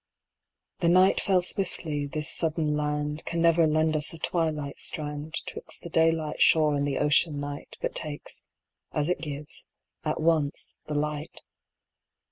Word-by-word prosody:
The 170 - +3
night 185 +2 +5
fell 185 -2 +2
swiftly; 165 -7 -1
this 150 +2 -3
sudden 155 -2 +1
land 150 0 -2
Can 170 - -3
never 165 -1 +5
lend 155 +1 +2
us 150 0 0
a - - -9
twilight 155 -4 -2
strand 150 +1 -3
'Twixt - - -6
the 170 - -7
daylight 160 -2 +2
shore 155 -2 +5
and 145 0 0
the 135 -2 -1
ocean 150 0 +3
night, 145 0 -6
But - - -2
takes 150 -2 -3 0.5
as 150 +2 0
it - - -1
gives 150 -1 -7 0.4
at - - -1
once, 155 -3 +1
the 150 - -3
light. 150 +1 -3
155 Hz, 150 wpm, -27 LUFS, 150-165 Hz, 0.5 s, night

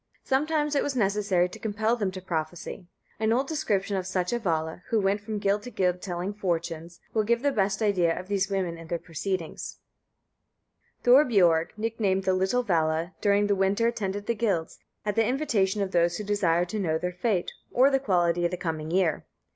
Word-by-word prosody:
Sometimes 300 +2 +1
it 280 - +2
was 285 - -2
necessary 200 -5 +2
to 180 - -11
compel 220 +2 0
them 205 -5 -1
to 185 0 -8
prophesy. 170 +1 -4 0.3
An 220 0 +1
old 260 +4 +1
description 205 -11 -1
of 185 -1 -2
such 185 +1 -1
a 240 - 0
Vala, 160 -4 -2
who 225 - +2
went 200 +1 +1
from 215 +1 -4
guild 200 0 +1
to 245 - -8
guild 180 -5 0
telling 180 +1 -3
fortunes, 170 -3 -3
will 220 - +3
give 235 +3 +1
the 285 - +3
best 200 -2 0
idea 180 -5 +2
of 185 - -9
these 195 -1 0
women 185 -4 -2
and 165 0 -11
their 170 - 0
proceedings": 170 +1 -4 1.3
"Thorbiorg, 205 - +4
nicknamed 215 -4 0
the 190 - +2
little 190 +7 +1
Vala, 165 -3 0
during 205 0 +3
the 205 - +2
winter 195 +4 +2
attended 205 -3 -3
the 235 - +1
guilds, 205 -8 -1 0.3
at 210 - 0
the 225 - +4
invitation 215 -8 +1
of 190 - -4
those 175 -1 +2
who 210 - -4
desired 180 -4 +1
to 215 - -3
know 160 -5 +1
their 180 +2 -3
fate, 180 0 -1 0.2
or 265 +3 +5
the 270 - +3
quality 175 -7 +1
of 175 - +2
the 180 - -4
coming 160 -3 -3
year. 175 -3 +1
195 Hz, 195 wpm, -27 LUFS, 175-220 Hz, 1.3 s, or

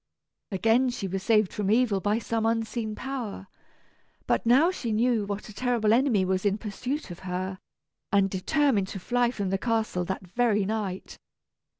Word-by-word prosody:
Again 225 +6 +3
was 245 -1 -2
she 195 -2 -3
saved 215 0 +2
from 205 -2 -1
evil 220 -2 +3
by 205 +3 +1
some 230 -1 -2
unseen 225 -1 -1
power; 240 -7 -5 0.8
but - - 0
now 280 +9 +5
she 240 -11 -4
knew 225 -1 +2
what 200 0 -4
a 215 - -11
terrible 235 -2 +1
enemy 235 -6 +3
was 185 0 0
in 205 -1 +1
pursuit 230 +5 -4
of 175 - -8
her, 185 +1 -4 0.5
and 200 -1 +4
determined 205 +2 +1
to 195 - -6
fly 245 +5 +1
from 200 -6 -3
the 195 - 0
castle 220 -6 0
that 190 +1 -4
very 210 +1 +1
night. 200 -3 -4
215 Hz, 170 wpm, -27 LUFS, 195-240 Hz, 0.8 s, now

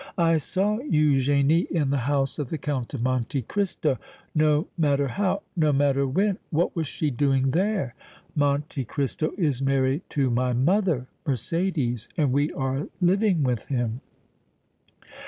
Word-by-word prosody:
"I 165 -2 +3
saw 200 +8 0
Eugénie 145 - +2
in 150 -5 0
the 140 - +2
house 140 0 0
of 140 -4 -3
the 160 - -2
Count 140 -3 -3
of 120 - -3
Monte 130 +1 -1
Cristo, 165 - -1 0.3
no 155 +1 +3
matter 140 -4 +1
how, 200 +4 -1
no 155 -4 +3
matter 140 -1 +2
when. 195 +8 +1
What 170 +1 0
was 165 -3 -1
she 150 +1 -2
doing 135 0 +2
there?" 185 - 0 0.4
"Monte 145 -1 0
Cristo 145 +5 -2
is 145 -9 0
married 135 +2 +1
to 135 -4 +1
my 125 +1 +1
mother, 160 - +2 0.2
Mercédès, 135 - -1
and 145 -5 +2
we 145 +2 +1
are 135 +2 -2
living 185 -2 +3
with 125 -4 -1
him." 120 -2 -2
145 Hz, 145 wpm, -25 LUFS, 135-165 Hz, 0.4 s, I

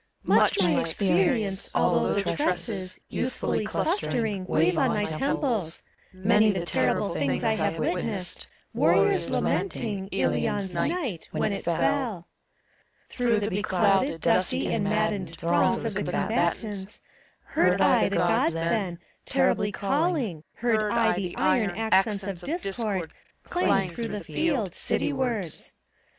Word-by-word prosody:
139 - - +1
CHORUS. 195 - +4
Much - - +4
my 165 - +2
experience, 190 +3 +1
although - - +2
the 200 -4 0
tresses, 185 +2 -1
Youthfully 250 -3 -2
clustering, 220 - -1
wave 170 +1 +2
on - - +3
my 210 - 0
temples; 205 - -1 0.3
Many 210 +3 +3
the 185 -4 -1
terrible 200 - +1
things 140 -5 -1
I 225 - +2
have 190 -6 -1
witnessed, 180 +3 -2 0.3
Warriors - - +3
lamenting, 205 - -1
Hion's 195 0 0
night, 285 - -2
When 210 - -1
it - - -5
fell. 190 +2 0 0.8
Through 235 -4 +1
the 210 - -2
beclouded, 190 -3 +1
dusty 90 - +1
and 200 - 0
maddened 205 -5 -1
Throngs 175 +8 +1
of 225 - -2
the 205 - -2
combatants, 205 0 -2 0.4
heard - - +2
I - - +4
the - - -2
Gk>ds 165 - +2
then 170 +2 -1 0.3
Terribly 255 -6 +1
calling, 240 - -1
heard 230 -2 +1
I 230 -1 +3
the 180 -3 -4
iron 205 -7 +1
Accents 210 -2 +2
of 190 -3 -5
Discord 210 - -2 0.3
clang 195 - +1
through 230 +7 -4
the 210 -2 -5
field, 260 - -1
City 295 - -1
wards. 235 - -3
200 Hz, 135 wpm, -26 LUFS, 180-225 Hz, 0.8 s, CHORUS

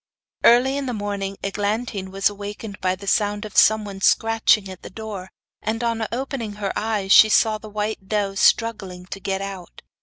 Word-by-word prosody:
Early 255 +4 +5
in 280 -1 -3
the 250 - -2
morning 200 -1 -4
Eglantine 205 0 -2
was 195 +1 +1
awakened 205 0 -7
by 185 0 +1
the 200 +2 -11
sound 205 +1 0
of 210 - -10
someone 210 -3 +3
scratching 225 -1 +3
at 185 -1 -10
the - - -9
door, 200 -2 -7 0.3
and 225 +2 -2
on 230 -2 -1
opening 245 -3 -4
her 205 -1 -3
eyes 210 -3 -1
she 215 - +8
saw 215 0 +3
the 215 - -10
white 210 -1 -4
doe 205 -1 -1
struggling 195 -4 +1
to 195 - -7
get 195 0 -3
out. 195 -3 -9
205 Hz, 180 wpm, -22 LUFS, 195-220 Hz, 0.3 s, she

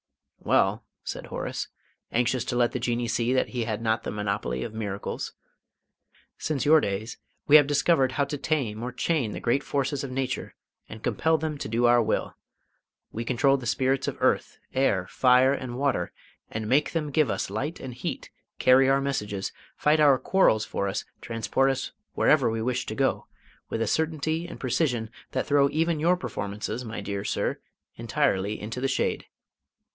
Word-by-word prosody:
"Well," - - +2 0.2
said - - -6
Horace, - - -4 0.4
anxious 125 +1 +1
to - - -2
let 120 -1 +3
the 125 - -3
Jinnee 120 0 -1
see 115 +1 0
that 130 - +2
he 120 -3 -2
had 110 -1 -2
not 110 0 0
the - - -5
monopoly 100 -12 -2
of - - -6
miracles, 100 -3 -4 1.1
"since 150 -3 -1
your 155 +1 +6
days 100 +3 -3 0.3
we 150 - +7
have 145 -2 +5
discovered 145 -2 +3
how 140 +1 +1
to 145 +1 -4
tame 125 -10 -1
or 125 +1 -3
chain 130 -2 0
the - - -5
great 135 +4 +1
forces 140 0 -1
of 140 - -4
Nature 130 0 -3 0.3
and 110 - -10
compel 160 +1 +2
them 155 -1 -3
to - - -4
do 115 +2 +2
our 120 0 +6
will. 110 - -1 0.8
We 115 - -4
control 135 +3 +3
the 125 -3 -6
Spirits 130 +3 +1
of - - -3
Earth, - - +1 0.2
Air, 100 -9 +2
Fire, 130 +1 +4
and 125 -3 -4
Water, 135 -11 0 0.4
and 110 0 -4
make 140 +6 +2
them 155 -3 -1
give 150 0 +3
us - - -2
light 150 +5 -3
and 130 -2 -7
heat, 125 - -5 0.3
carry 130 +1 +5
our 135 0 +3
messages, 105 -8 -2 0.3
fight 150 +1 +3
our 145 -3 +6
quarrels 130 - +3
for 100 - -2
us, 95 - -3 0.2
transport 115 +4 0
us 135 -1 -2 0.2
wherever - - +4
we 110 0 -2
wish 125 +1 -1
to - - -4
go, - - 0 0.4
with 115 - -1
a - - -2
certainty 160 +4 0
and - - -9
precision 125 -4 0 0.2
that - - 0
throw 140 -1 +4
even 160 +2 0
your 175 +4 +3
performances, 105 - -4
my 115 -1 -5
dear 100 -1 -4
sir, - - -1 0.4
entirely 105 -3 0
into 115 +4 -5
the 135 - +1
shade." 135 - -1
125 Hz, 180 wpm, -26 LUFS, 110-140 Hz, 1.1 s, we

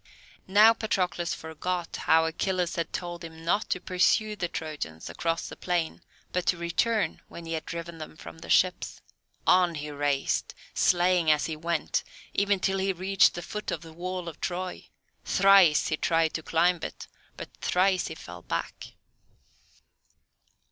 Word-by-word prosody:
Now 210 +4 +7
Patroclus 180 -6 -1
forgot 165 +2 -4
how 160 0 +3
Achilles 180 +2 -1
had 170 -2 -2
told 175 0 -5
him 165 0 -10
not 205 +6 +1
to - - 0
pursue 195 +4 +2
the 180 -4 -2
Trojans 150 - -6
across 165 -1 -2
the - - -8
plain, 175 -3 -2 0.3
but 180 0 -2
to 175 - +3
return 175 +2 0
when 170 - -10
he 165 - -4
had 160 - -4
driven 170 0 -6
them 155 0 -9
from 160 - -11
the - - -11
ships. 180 -1 +2 0.5
On 180 -2 +4
he 150 0 -5
raced, 145 -1 -1 0.2
slaying 175 -2 +3
as 150 -1 +4
he 160 - -3
went, 165 +1 -1 0.3
even 200 -1 +2
till 195 +1 0
he 195 +1 +1
reached 190 +2 +3
the 175 - -5
foot 210 0 -5
of - - -2
the 165 -1 -12
wall 180 +1 -4
of 165 - -8
Troy. 185 0 -4 0.4
Thrice 195 -6 +5
he 155 - 0
tried 165 -1 +2
to 160 - -3
climb 170 +2 +2
it, - - -7 0.3
but - - -9
thrice 185 0 +2
he - - -6
fell - - -10
back. - - -5
175 Hz, 160 wpm, -28 LUFS, 160-185 Hz, 0.5 s, Now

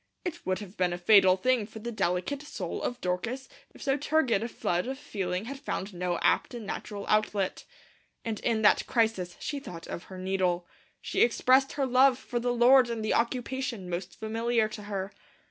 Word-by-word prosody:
It 345 -1 -4
would 185 0 +1
have 205 -1 -10
been 180 -1 +1
a - - -3
fatal 185 0 +6
thing 245 0 +1
for 220 - -11
the 235 +2 -5
delicate 195 +6 -1
soul 295 - -5
of 245 - -3
Dorcas 225 +9 -2 0.2
if - - -13
so 270 0 +1
turgid 285 -7 +2
a 230 - -2
flood 180 -4 -1
of 265 +1 -3
feeling 195 -8 -3
had 270 +3 -6
found 205 -7 -4
no 175 -1 -1
apt - - +2
and 230 -3 -6
natural 200 0 -5
outlet. 210 -2 0 0.6
And 225 -2 -2
in 225 -2 0
that 210 - +4
crisis 220 -7 0
she 290 - -3
thought 170 -10 -9
of 170 - -6
her 190 - -10
needle. 185 -2 0 0.4
She - - -1
expressed 260 +3 +4
her 280 -2 0
love 260 0 +5
for 245 -2 -3
the 245 +1 0
Lord 245 +1 +6
in 230 -2 -3
the 215 - +1
occupation 240 -4 -2
most 175 +1 -5
familiar 225 +1 +1
to 215 -1 -8
her. 195 -1 -4
220 Hz, 195 wpm, -29 LUFS, 185-250 Hz, 0.6 s, fatal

